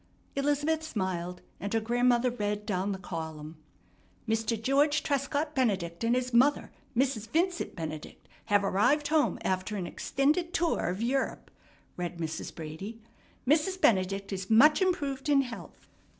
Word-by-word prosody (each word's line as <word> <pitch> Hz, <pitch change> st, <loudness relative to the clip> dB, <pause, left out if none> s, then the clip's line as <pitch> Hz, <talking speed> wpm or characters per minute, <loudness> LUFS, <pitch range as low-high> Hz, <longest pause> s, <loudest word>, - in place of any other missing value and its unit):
Elizabeth 290 Hz, +3 st, +1 dB
smiled, 185 Hz, -, -3 dB, 0.2 s
and 200 Hz, +3 st, -3 dB
her -, -, +4 dB
grandmother 240 Hz, +2 st, +2 dB
read 210 Hz, -2 st, -2 dB
down, 195 Hz, 0 st, -1 dB
the 195 Hz, -, -3 dB
column: 160 Hz, -3 st, -6 dB, 0.7 s
"Mr. 225 Hz, 0 st, 0 dB
George 280 Hz, +5 st, +2 dB
Trescott 285 Hz, +2 st, -1 dB
Benedict 195 Hz, -, 0 dB
and 235 Hz, +1 st, +3 dB
his 250 Hz, 0 st, -1 dB
mother, 265 Hz, +5 st, +3 dB, 0.3 s
Mrs. 250 Hz, -4 st, +1 dB
Vincent 345 Hz, +5 st, 0 dB
Benedict, 155 Hz, -3 st, -7 dB, 0.2 s
have 205 Hz, -2 st, +3 dB
arrived 250 Hz, +10 st, +2 dB
home 310 Hz, -1 st, +2 dB
after 185 Hz, +3 st, -1 dB
an 190 Hz, -3 st, -3 dB
extended 305 Hz, -, 0 dB
tower 335 Hz, -, +1 dB
of 185 Hz, +5 st, -3 dB
Europe," 265 Hz, +3 st, -1 dB, 0.5 s
read 175 Hz, -1 st, -4 dB
Mrs. 160 Hz, -1 st, -5 dB
Brady. 165 Hz, +8 st, -7 dB, 0.5 s
"Mrs. 330 Hz, +6 st, +2 dB
Benedict 195 Hz, -, +2 dB
is 190 Hz, 0 st, -5 dB
much 290 Hz, -, +6 dB
improved 295 Hz, -7 st, 0 dB
in 280 Hz, -1 st, +5 dB
health. 245 Hz, -3 st, -10 dB
230 Hz, 140 wpm, -29 LUFS, 190-285 Hz, 0.7 s, much